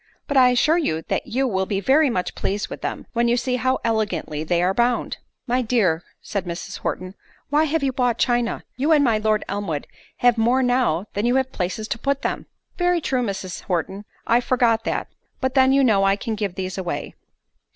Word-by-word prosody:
But 285 - -3
I 255 -2 +7
assure 305 +7 +3
you 160 - -1
that - - -1
you 265 +3 0
will 190 -4 -1
be 195 - -1
very 275 +8 +4
much 185 -7 -2
pleased 205 +2 -2
with - - -7
them, - - -4
when 235 0 +2
you 240 +1 +2
see 250 +1 0
how 260 +1 +1
elegantly 205 -9 -1
they 170 +2 +1
are 185 +2 +2
bound." 240 +3 0 0.3
"My 250 0 +1
dear," 215 -9 +1 0.2
said 200 -3 -3
Mrs. 170 -1 -6
Horton, 185 0 -4 0.4
"why 300 +2 +4
have 315 0 0
you 265 -1 +1
bought 245 -2 +1
china? 240 -1 0
You 295 +5 +3
and 295 -2 +5
my 230 -5 +2
Lord 215 0 +1
Elmwood 195 -7 -3 0.3
have 245 -2 +3
more 245 +4 +3
now, 245 -8 +1
than 205 +4 0
you 245 - +2
have 265 0 +1
places 190 +2 -3
to - - -2
put 275 +2 -1
them - - -1
in." - - -16 0.3
"Very 355 0 +2
true, 265 -5 -1
Mrs. 195 -5 -4
Horton—I 195 +6 -1
forgot 240 -3 +2
that—but 260 -1 -4
then 265 -1 +5
you 275 0 +4
know 210 -6 +4
I 195 0 +4
can 225 +2 -4
give 205 -4 -3
these 190 0 -4
away." 175 -2 -4
235 Hz, 205 wpm, -22 LUFS, 195-260 Hz, 0.4 s, I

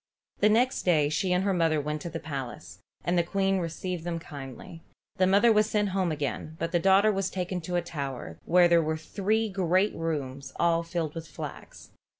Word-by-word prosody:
The 210 - +5
next 245 +4 +2
day 155 -5 +3
she 185 +4 0
and 180 +1 +2
her 195 -1 +1
mother 165 -3 +2
went 150 +1 -3
to 170 - -5
the 165 0 -5
palace, 130 - -7 0.2
and 175 +2 +1
the - - +3
Queen 195 +2 +1
received 175 0 -4
them 170 -1 -2
kindly. 150 +2 -9 0.4
The 185 - +4
mother 205 +5 +5
was 215 0 +3
sent 210 -2 +1
home 185 -2 0
again, 150 +1 -3
but 165 +1 -3
the 175 - +2
daughter 195 +4 +5
was 195 -1 -1
taken 180 -1 -3
to 175 +2 -4
a 175 - +1
tower 135 - -6
where 175 +1 +5
there 170 -1 +5
were 155 0 -1
three 210 +7 0
great 190 0 +1
rooms 140 -5 -4
all 170 -1 +3
filled 165 -2 -3
with 165 -1 -7
flax. 155 - -9
170 Hz, 200 wpm, -28 LUFS, 155-190 Hz, 0.4 s, The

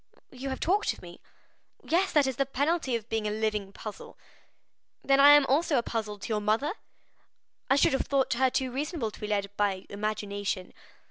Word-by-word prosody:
"You 265 +1 -6
have 265 - -4
talked 400 +5 +1
of - - -15
me?" - - -12 0.6
"Yes, 365 +4 +1
that 295 -2 +4
is 265 -2 -2
the 275 - +2
penalty 285 -1 0
of 225 -1 -4
being 220 -2 -1
a - - 0
living 210 -2 -2
puzzle!" 210 +1 -9 0.9
"Then 275 0 +3
I 285 +1 +9
am 290 -1 +6
also 290 +3 +2
a 235 - +1
puzzle 215 -3 -3
to 205 - -8
your 215 -1 0
mother? 225 - +1 1.0
I 270 - +5
should 280 - +4
have 270 - -1
thought 275 -2 +1
her 260 +2 +2
too 260 0 -1
reasonable 280 -3 -3
to - - -14
be 210 - -3
led 200 -1 -2
by 195 -2 0
imagination." 205 -2 -3
235 Hz, 195 wpm, -28 LUFS, 210-275 Hz, 1.0 s, I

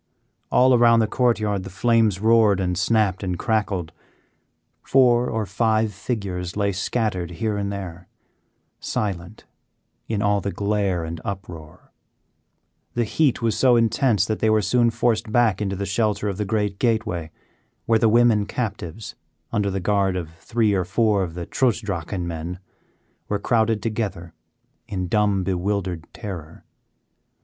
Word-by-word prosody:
All 130 +1 +5
around 120 -1 +5
the 110 - +3
court 120 +1 +1
yard 105 -2 -1
the 95 - -8
flames 110 -1 +2
roared 110 -2 +4
and 90 -1 -1
snapped 95 0 +1
and 90 -3 -2
crackled. 100 -7 -1 0.9
Four 125 -2 +3
or 110 -2 -1
five 110 +1 +1
figures 95 -4 -4
lay 100 -1 +1
scattered 95 -2 -2
here 105 +5 -2
and 100 -1 -2
there, 90 -3 -7 0.7
silent 100 0 -4 0.6
in 105 -3 -1
all 100 0 +2
the 100 - -3
glare 100 -4 -1
and 80 0 -6
uproar. 90 -6 -8 1.0
The 120 - +2
heat 130 +1 +1
was 115 -2 +1
so 125 -2 +4
intense 115 -3 +2
that 110 0 -2
they 110 - +2
were 110 -1 +3
soon 120 +1 +3
forced 115 -1 0
back 110 -3 +2
into 100 -2 -1
the 100 +1 -3
shelter 105 +1 0
of 100 -2 -3
the 105 - -2
great 105 -1 -1
gateway, 110 -9 0 0.6
where 115 -1 +3
the 115 - +4
women 115 -3 +4
captives, 105 -4 -5 0.4
under 100 -1 0
the 95 0 -2
guard 95 0 +1
of 85 -3 -4
three 115 -3 +1
or 95 -2 +1
four 105 +2 +1
of 85 -3 -4
the 85 -1 -5
Trutz 125 +1 +1
Drachen 95 -3 -4
men, 85 +2 -5 0.7
were 105 - 0
crowded 110 0 +1
together 105 -7 -3 0.5
in 95 -3 -3
dumb, 105 -1 +1
bewildered 95 -2 -2
terror. 90 -8 -8
105 Hz, 150 wpm, -23 LUFS, 95-110 Hz, 1.0 s, All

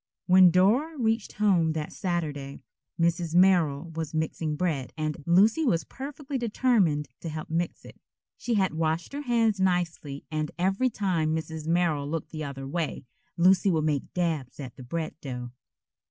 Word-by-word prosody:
When 185 0 +7
Dora 225 - +3
reached 225 -3 0
home 185 -7 +2
that 155 -1 -4
Saturday, 150 -7 -3 0.4
Mrs. 170 0 +1
Merrill 170 -4 +3
was 160 -1 -4
mixing 155 0 -1
bread 150 -6 -1
and 155 -1 -2
Lucy 210 - +4
was 175 - +2
perfectly 275 0 -6
determined 210 - +2
to 165 - -5
help 155 0 -6
mix 170 +1 -2
it. - - -14 0.3
She 240 - -2
had 190 -4 +2
washed 160 +6 -1
her 285 - -3
hands 230 -6 +1
nicely 175 -6 -1
and 155 -1 -1
every 195 +8 +1
time 170 -8 0
Mrs. 160 -1 -5
Merrill 165 -4 +1
looked 165 0 -4
the 155 -1 -5
other 135 -2 -6
way 160 -1 -3 0.3
Lucy 185 +3 +4
would 160 -4 +1
make 145 -3 -1
dabs 160 -8 -2
at 130 -4 -7
the - - -12
bread 155 +6 -4
dough. 125 -3 -6
170 Hz, 160 wpm, -27 LUFS, 155-190 Hz, 0.4 s, When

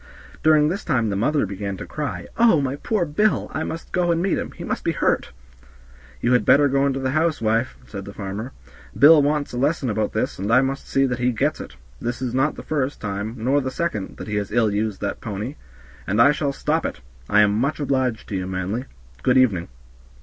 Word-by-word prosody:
During 155 -1 +5
this 195 +5 -3
time 120 -8 +1
the - - -1
mother 140 +6 +1
began 100 0 -5
to - - -7
cry, 150 -3 -4
"Oh, 230 -9 +5
my 135 -1 -1
poor 205 +2 0
Bill, 205 +8 +1
I 160 - -2
must 165 +1 -6
go 180 -1 +1
and 165 - +1
meet 190 +2 +1
him; - - -4
he - - -9
must - - -3
be - - 0
hurt." - - 0 0.9
"You 120 - +2
had 125 - +4
better 145 +1 +5
go 140 0 +2
into 135 -1 -1
the 130 -1 -1
house, 155 +2 +1
wife," 115 +3 0
said 100 -2 -7
the 100 - -9
farmer; 105 +5 -5 0.5
"Bill 150 +1 +8
wants 145 -1 0
a 120 - -2
lesson 140 -2 +1
about 105 0 -1
this, - - -2
and 100 +3 -2
I 125 +3 +6
must 135 +1 -3
see 135 0 +3
that 125 -2 -2
he 125 +1 +2
gets 110 - -1
it; - - -10 0.3
this 120 +1 -3
is 125 -2 -3
not 135 +4 +1
the - - -9
first 145 -2 -2
time, 105 +2 -4
nor 130 +6 +1
the 130 - -2
second, 130 - -3
that - - -7
he 105 -1 -2
has 100 0 -3
ill 110 -1 +2
used 105 -1 -2
that - - -3
pony, 110 +5 -4 0.5
and 100 +3 0
I 140 +5 +7
shall 145 -1 -1
stop 155 +3 -1
it. - - -4 0.3
I 105 - +5
am 100 -1 +4
much 135 +9 0
obliged 130 -5 -1
to 105 - -3
you, 95 -1 -2
Manly. 95 +7 -3 0.4
Good 125 - +3
evening." 105 -10 +3
130 Hz, 230 wpm, -22 LUFS, 105-145 Hz, 0.9 s, Bill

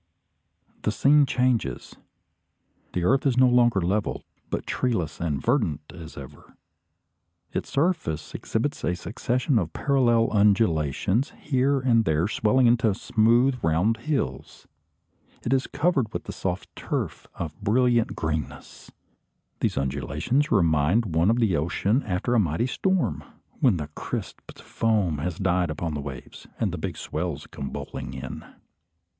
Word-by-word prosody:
The 105 - 0
scene 140 +6 +4
changes. 125 - 0 1.0
The 90 - -1
earth 135 +9 +3
is 125 -2 +1
no 130 0 +6
longer 120 -4 +4
level, 100 +5 -1 0.3
but - - -3
treeless 100 -11 -1
and 75 -5 -1
verdant 110 - 0
as 80 -3 -10
ever. 70 +1 -12 1.0
Its - - -3
surface 140 - -1
exhibits - - -2
a 85 +5 0
succession 125 - 0
of 85 -4 -3
parallel 120 -5 +3
undulations, 100 - +2
here 135 0 +1
and 120 -3 +3
there 80 -1 +1
swelling 110 +4 +2
into 115 -3 +3
smooth 120 +5 +3
round 85 +8 +2
hills. 115 - -3 0.8
It 120 - 0
is 130 0 +1
covered 145 -6 0
with - - -5
a - - -3
soft 95 0 -4
turf - - -4
of 75 -3 -6
brilliant 120 +1 +2
greenness. 80 -3 -5 0.7
These - - 0
undulations 70 - 0
remind 85 +2 +2
one 85 +4 +4
of 115 - +3
the 110 -7 +2
ocean 95 - +1
after 100 +6 -1
a 120 - +4
mighty 85 +3 +1
storm, 185 +7 0 0.4
when 125 - +4
the 75 -2 -5
crisped - - -7
foam 105 -9 0
has 85 +2 -3
died 90 -3 +1
upon 80 +1 -3
the 75 - -3
waves, 70 -3 -9
and - - 0
the - - -5
big - - -4
swell 80 -1 -3
comes 70 - -5
bowling 65 -1 -6
in. 65 0 -7
105 Hz, 140 wpm, -25 LUFS, 80-125 Hz, 1.0 s, no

